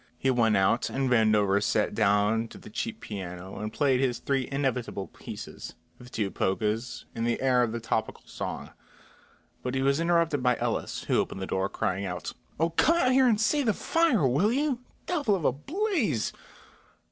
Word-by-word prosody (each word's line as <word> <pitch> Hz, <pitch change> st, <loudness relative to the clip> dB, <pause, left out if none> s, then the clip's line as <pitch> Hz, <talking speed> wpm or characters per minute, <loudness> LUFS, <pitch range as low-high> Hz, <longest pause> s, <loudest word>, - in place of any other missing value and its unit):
He 135 Hz, -, +1 dB
went 115 Hz, -4 st, +3 dB
out 95 Hz, +5 st, +2 dB
and 135 Hz, -1 st, -1 dB
Vandover 105 Hz, -4 st, +4 dB
sat 105 Hz, +1 st, +1 dB
down 105 Hz, +2 st, +2 dB
to -, -, -12 dB
the -, -, -12 dB
cheap 230 Hz, -, -4 dB
piano 95 Hz, -2 st, -7 dB
and 105 Hz, 0 st, -4 dB
played 135 Hz, 0 st, +2 dB
his 130 Hz, -3 st, +1 dB
three 135 Hz, -2 st, -1 dB
inevitable 130 Hz, -7 st, -1 dB
pieces, -, -, -9 dB, 0.2 s
the 125 Hz, -, -12 dB
two 105 Hz, -5 st, -2 dB
polkas 110 Hz, +5 st, -1 dB
and 115 Hz, 0 st, -2 dB
the 120 Hz, -, 0 dB
air 130 Hz, -2 st, +3 dB
of 120 Hz, -2 st, +1 dB
the 115 Hz, -, -3 dB
topical 110 Hz, -1 st, -2 dB
song; -, -, -6 dB, 0.9 s
but 125 Hz, +1 st, -3 dB
he 135 Hz, -, 0 dB
was 140 Hz, +2 st, +2 dB
interrupted 170 Hz, -4 st, +2 dB
by 125 Hz, -1 st, +2 dB
Ellis, -, -, -2 dB
who -, -, +1 dB
opened -, -, -2 dB
the 95 Hz, -, -3 dB
door, 95 Hz, +1 st, -1 dB
crying 95 Hz, 0 st, -2 dB
out: 90 Hz, -3 st, -5 dB, 0.3 s
"Oh, 165 Hz, +1 st, +2 dB
come 325 Hz, -, +3 dB
out 255 Hz, -7 st, +3 dB
here 260 Hz, 0 st, +5 dB
and 220 Hz, -3 st, +3 dB
see 285 Hz, +7 st, +2 dB
the 220 Hz, -7 st, +1 dB
fire, 325 Hz, -, +2 dB
will 150 Hz, -, +2 dB
you? 275 Hz, -1 st, 0 dB, 0.3 s
Devil 290 Hz, -, +1 dB
of 175 Hz, -, -3 dB
a -, -, +5 dB
blaze!" 260 Hz, -, -1 dB
125 Hz, 185 wpm, -28 LUFS, 110-175 Hz, 0.9 s, here